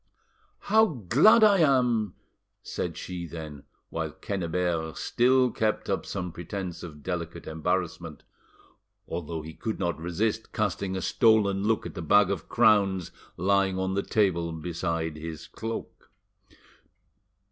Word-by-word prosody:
"How 220 +2 +4
glad 150 - +5
I 205 -3 +6
am!" 125 - +2 0.5
said - - -4
she 90 -2 -5
then, 75 -3 -8 0.3
while - - -2
Quennebert 85 -3 -2
still 125 +1 +3
kept 110 -1 -1
up - - -2
some 90 -3 -4
pretence 90 0 -6
of 75 -4 -10
delicate 85 -2 -4
embarrassment, 85 -1 -3 0.8
although 80 -1 -4
he 80 +1 -8
could 110 +5 -4
not 85 -4 -2
resist 105 +7 -2
casting 100 -2 -1
a 95 - -3
stolen 105 -4 +3
look 110 0 +1
at 85 - -6
the - - -6
bag 100 +5 +4
of 95 -5 -4
crowns 100 -6 +3 0.3
lying 95 +1 +2
on 95 0 -1
the 100 - +1
table 90 -6 +1
beside 80 -1 -3
his 80 0 -7
cloak. 115 +1 -7
95 Hz, 130 wpm, -27 LUFS, 85-110 Hz, 0.8 s, I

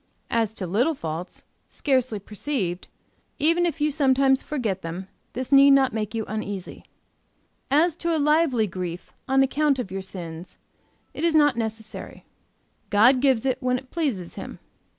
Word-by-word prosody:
As 225 -2 0
to 190 - -4
little 235 - +1
faults, 165 - -6 0.2
scarcely 255 -5 0
perceived, 200 -3 -4 0.5
even 335 +4 +3
if 325 -1 -4
you 300 +1 +1
sometimes 270 -2 +3
forget 225 -10 -3
them, 170 +3 -6 0.3
this 255 +2 -4
need 275 0 +8
not 265 -4 +2
make 215 0 -3
you 220 -1 -2
uneasy. 205 -3 -5 0.8
"As 310 +4 +3
to 335 -1 0
lively 300 -6 +3
grief 180 -2 -6
on 270 0 +4
account 285 +1 +1
of 240 -8 -4
your 195 0 -3
sins, 175 -2 -8 0.6
it - - -6
is 335 -1 +2
not 290 -4 +5
necessary. 220 -1 -6 0.6
God 240 +6 +5
gives 265 -4 +2
it 260 -2 0
when 250 0 +1
it 255 +1 -12
pleases 260 - -2
Him. - - -7
250 Hz, 150 wpm, -24 LUFS, 200-285 Hz, 0.8 s, need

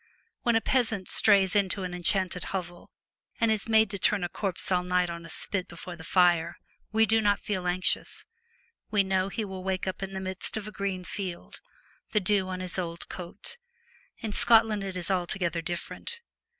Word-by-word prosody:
When 235 -1 +2
a 225 - +4
peasant 220 -6 +1
strays 200 -2 +5
into 195 -1 +1
an 180 -1 -4
enchanted 180 0 0
hovel, 175 -2 -5 0.5
and 230 -2 +3
is 220 +1 -1
made 220 -2 +5
to 200 - -4
turn 205 -1 +2
a 175 - -1
corpse 195 0 -2
all 180 -1 +3
night 180 -1 +1
on 170 0 -7
a - - -13
spit 185 +2 -2
before 175 +1 -8
the 160 - -11
fire, 170 -1 +3 0.3
we 220 0 +4
do 225 +1 +3
not 205 -1 +3
feel 185 -4 -2
anxious; 180 +1 -1 0.6
we 205 -2 +3
know 190 0 +1
he 220 +2 -3
will 190 -2 -7
wake 190 -1 -1
in 195 +1 -4
the 190 - -3
midst 190 +2 -2
of 210 -1 -5
a - - -6
green 195 -3 -3
field, 180 -2 -6 0.5
the 210 - +4
dew 195 -1 +2
on 185 0 -4
his 185 0 -1
old 170 -1 -5
coat. 185 - -6 0.6
In 220 -3 -4
Scotland 225 -3 +4
it 190 -1 -4
is 180 +2 -3
altogether 175 -2 0
different. 175 - -5
190 Hz, 190 wpm, -28 LUFS, 180-210 Hz, 0.6 s, strays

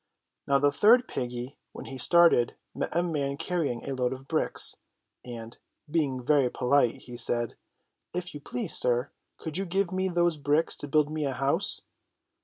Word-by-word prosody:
Now 140 - +4
the 145 +1 +3
third 235 - +5
Httle - - -31
piggy, 125 +2 -5 0.2
when - - -9
he 135 -1 -8
started, 170 -5 +5 0.2
met - - -4
a 175 - +2
man 140 -5 -2
carrying 150 -11 -2
a 135 - -2
load 125 -1 -1
of 130 +1 -11
bricks, 160 - +2 0.5
and, 115 -2 -9 0.4
being 135 -6 -1
very 140 -3 +3
polite, 125 -1 +1
he 125 - -10
said: 120 -1 +1 0.6
If 180 0 -5
you 145 - -7
please, 125 -3 -2
sir, 125 +2 +1 0.3
could 160 +2 -2
you 195 - -2
give 190 +1 0
me 185 0 -1
those 175 -2 +1
bricks 145 +3 +1
to 145 - -6
build 150 +1 +2
me 155 -1 -2
a 135 - -1
house 140 +9 0
145 Hz, 180 wpm, -27 LUFS, 125-170 Hz, 0.6 s, third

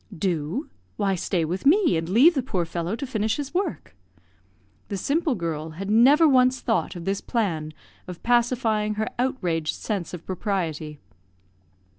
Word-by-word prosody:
"Do? 175 - -2 0.3
why, 200 -2 +1
stay 175 -2 -1
with 180 +4 -3
me, 335 - +4
and 165 +1 -2
leave 260 - +6
the 275 - 0
poor 185 -9 -2
fellow 170 +4 -3
to 275 - -5
finish 220 -3 -1
his 290 0 -5
work." 360 - -3 0.9
The 200 - -4
simple 295 - 0
girl 160 -3 -3
had 195 +2 -3
never 275 +9 +6
once 255 -2 +4
thought 225 -4 -1
of 170 -1 -7
this 195 0 -1
plan 170 -10 -2 0.4
of 180 -2 -9
pacifying 230 -3 +1
her 215 +1 -1
outraged 180 - -1
sense 200 -6 -4
of 170 - -12
propriety. 165 -6 -3
210 Hz, 155 wpm, -24 LUFS, 170-255 Hz, 0.9 s, leave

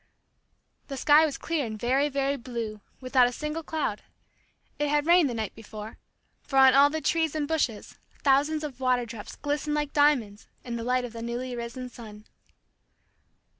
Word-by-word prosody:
The 275 - -6
sky 300 +4 +5
was 280 - -5
clear 330 -3 -2
and 215 -3 -5
very, 265 +6 +2
very 275 0 0
blue, 235 -5 -5 0.2
without 255 -1 +4
a - - -3
single 300 +5 -4
cloud. 300 -9 -3 0.8
It 295 0 0
had 295 0 +1
rained 340 -3 +5
the 240 - -4
night 220 -3 -3
before, 215 -1 -10 0.4
for 270 - -3
on 265 -1 +8
all 280 +1 +6
the 315 +1 -3
trees 320 -2 0
and 300 -2 -1
bushes 285 -9 -2 0.2
thousands 290 +3 +3
of 275 -4 -6
water 250 -2 +1
drops 225 -2 -9
glistened 295 +1 -2
like 295 -1 -2
diamonds 255 -9 +2 0.2
in 240 -1 -5
the 230 - -4
light 250 +1 +1
of 235 - -9
the 230 - -7
newly 245 +2 -4
risen 240 +2 -6
sun. 215 -3 -12
260 Hz, 175 wpm, -27 LUFS, 235-295 Hz, 0.8 s, on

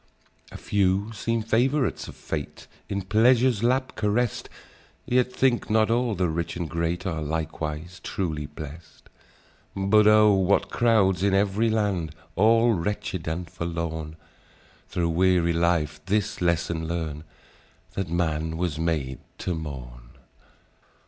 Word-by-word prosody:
"A - - -8
few 100 +1 +1
seem 115 +1 -1
favourites 125 +3 +1
of - - -10
fate, 75 -3 -6 0.2
In 100 -1 -2
pleasure's 115 +3 +3
lap 130 +2 +1
carest; 110 +2 0 0.6
Yet, 125 0 +2
think 125 -2 +1
not 110 +1 +3
all 120 -2 +1
the 90 -1 +1
rich 85 +1 -3
and 85 -2 -3
great 85 +3 -2
Are 80 -4 -2
likewise 80 +2 -4
truly 80 -6 -3
blest: 75 +2 -11 0.7
But 105 +2 +4
oh! 105 -1 +6
what 95 0 +2
crowds 105 -6 +3
in 100 0 +2
ev'ry 100 +3 +2
land, 100 -8 -1 0.2
All 115 +4 +4
wretched 95 -2 -3
and 85 +2 -3
forlorn, 80 -2 -4 0.7
Thro' 85 -2 0
weary 85 0 +3
life 85 -3 +1
this 105 -1 0
lesson 85 -1 0
learn, 80 -3 -3 0.7
That 95 -4 -3
man 80 -1 -1
was 85 -3 -2
made 75 -6 -1 0.2
to 90 - -2
mourn. 60 -6 -8
90 Hz, 130 wpm, -25 LUFS, 80-105 Hz, 0.7 s, oh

